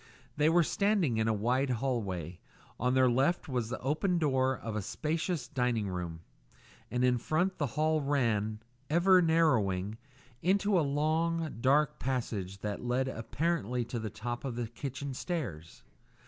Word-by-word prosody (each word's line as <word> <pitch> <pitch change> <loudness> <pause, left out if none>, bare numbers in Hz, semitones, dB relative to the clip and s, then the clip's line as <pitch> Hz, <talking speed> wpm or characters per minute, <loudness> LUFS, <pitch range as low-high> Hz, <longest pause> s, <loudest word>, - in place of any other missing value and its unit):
They 150 +1 +3
were 170 +1 +5
standing 195 - +1
in 110 0 +1
a - - +3
wide 125 +6 +1
hall 125 0 0
way; 90 -4 -5 0.4
on 125 +2 +1
their 130 -1 +5
left 135 +8 +2
was 125 -5 -2
the 130 - -3
open 155 +7 +1
door 130 -4 +2
of 110 -2 -5
a 105 - -1
spacious 155 - -2
dining 125 -5 0
room, 85 -3 -4 0.7
and 125 +1 0
in 125 -1 +3
front 180 +9 0
the 145 - +1
hall 155 0 +2
ran, 115 -7 0 0.3
ever 180 +3 +5
narrowing, 110 - +2 0.4
into 195 +2 +3
a - - +3
long, 155 +2 0
dark 140 +3 +3
passage 105 -7 -3
that 105 +1 -4
led 125 +2 0
apparently 125 -1 -1
to 120 0 -4
the 110 -1 -4
top 120 +3 -5
of 130 -4 -3
the 120 0 -2
kitchen 140 +3 -5
stairs. 115 - -5
130 Hz, 160 wpm, -31 LUFS, 110-155 Hz, 0.7 s, were